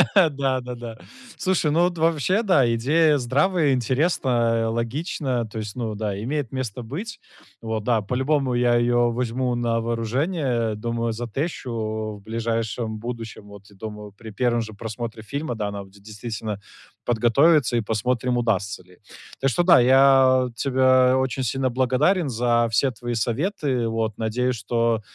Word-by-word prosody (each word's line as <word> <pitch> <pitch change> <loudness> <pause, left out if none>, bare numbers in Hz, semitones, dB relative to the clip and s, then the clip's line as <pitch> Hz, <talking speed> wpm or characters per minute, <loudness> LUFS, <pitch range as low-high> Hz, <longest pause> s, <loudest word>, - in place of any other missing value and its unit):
Да-да-да. 130 - 0 0.4
Слушай, 185 -5 +1
ну, 165 +3 +3
вот 175 -1 +1
вообще, 165 +6 +2
да, 140 - +3
идея 150 +6 +3
здравая, 145 +4 +2
интересная, 120 -4 +1
логичная, 120 +1 -2
то 110 +1 -7
есть, 105 0 -6
ну, 115 -3 -3
да, 100 -2 -3
имеет 140 -1 -2
место 125 -3 -4
быть. 175 - -6 0.4
Вот 110 -2 -3
да, 115 -2 +2
по-любому 130 +4 0
я 120 0 +3
её 120 0 +2
возьму 125 +1 -1
на 115 -1 0
вооружение, 120 - -1
думаю, 115 +1 -2
затещу 115 -4 -4
в - - -16
ближайшем 115 0 -2
будущем. 115 -2 -7
Вот, 100 -1 -13
думаю, 105 0 -8
при 110 -1 -10
1 120 +1 +1
же 110 -1 -7
просмотре 110 +1 -6
фильма, 140 +1 -4
да, 105 -2 -3
надо 100 -1 -6
будет 100 +1 -19
действительно, 110 -1 -5 0.5
подготовиться, 120 +2 +3
и - - +2
посмотрим, 120 +3 -1
удастся 100 -5 -1
ли. 90 0 -21 0.4
Так 135 - +2
что 175 +8 +1
да, 170 -7 +7
я 130 0 +5
тебя 130 0 +3
очень 130 0 -1
сильно 130 +2 0
благодарен, 135 +7 +1
за 120 0 +2
все 125 +5 +2
твои 120 +1 -5
советы. 130 - -1
Вот, 110 -2 -2
надеюсь, 125 +3 -1
что 115 +1 0
120 Hz, 145 wpm, -23 LUFS, 110-135 Hz, 0.5 s, да